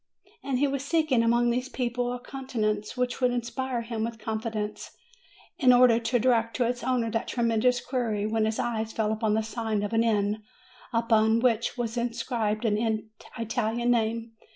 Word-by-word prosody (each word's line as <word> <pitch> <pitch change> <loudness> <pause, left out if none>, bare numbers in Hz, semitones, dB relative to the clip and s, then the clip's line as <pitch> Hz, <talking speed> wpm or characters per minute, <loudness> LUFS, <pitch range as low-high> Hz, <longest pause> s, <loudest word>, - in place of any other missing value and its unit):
And 270 -2 -1
he 285 +3 +3
was 275 -1 -2
seeking, 310 -5 +2
among 235 +1 +3
all 240 - +3
these 250 +2 -2
people, 245 -1 -2
a 245 - -4
countenance 220 -5 -3
which 250 0 0
should 250 -1 +2
inspire 245 +1 -2
him 230 -1 -3
with 230 0 -3
confidence, 220 -1 -4 0.6
in 255 -3 +6
order 245 -2 +6
to 235 +2 +1
direct 230 -1 +2
to 250 - +1
its 245 0 -3
owner 245 -3 0
that 225 0 -2
tremendous 240 +1 +2
query, 235 -5 -1
when 220 0 +1
his 220 0 -1
eyes 225 -2 -2
fell 215 -1 0
upon 220 -1 +1
the 220 - +1
sign 220 -2 -2
of 205 - -3
an 225 0 +3
inn 210 -1 +1 0.5
upon 230 -1 +3
which 235 0 +1
was 235 -1 -3
inscribed 230 -2 -1
an 220 0 0 0.3
Italian 230 +1 0
name. 230 0 0
230 Hz, 175 wpm, -27 LUFS, 220-245 Hz, 0.6 s, in